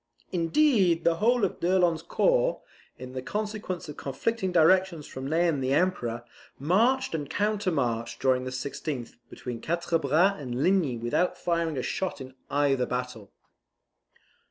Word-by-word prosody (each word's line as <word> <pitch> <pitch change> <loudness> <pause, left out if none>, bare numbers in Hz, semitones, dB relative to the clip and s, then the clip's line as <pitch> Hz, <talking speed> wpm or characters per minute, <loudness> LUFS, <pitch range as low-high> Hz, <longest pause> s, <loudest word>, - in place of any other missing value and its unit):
Indeed, 180 - +3
the 165 -1 +2
whole 235 +2 +3
of - - -4
d'Erlon's 175 -2 +2
corps, - - +1 0.3
in 130 0 -9
consequence 210 -1 -4
of 150 - -8
conflicting 190 - -2
directions 175 -1 +3
from 130 +1 -6
Ney 170 +3 +2
and 145 -5 0
the 130 +2 +1
Emperor, 120 -9 0 0.3
marched 230 - +2
and 150 -3 -3
countermarched, 160 - -1
during 130 -1 +2
the 130 - -4
16th, 130 -1 -5
between 120 -2 -7
Quatre 170 0 0
Bras 160 +5 +2
and 125 0 -3
Ligny 175 -10 +2
without 120 +10 0
firing 170 -3 -1
a 130 - -2
shot 190 -5 -3
in 130 -1 -9 0.2
either 140 -3 +1
battle. 125 -5 -5
165 Hz, 140 wpm, -27 LUFS, 130-190 Hz, 0.3 s, Indeed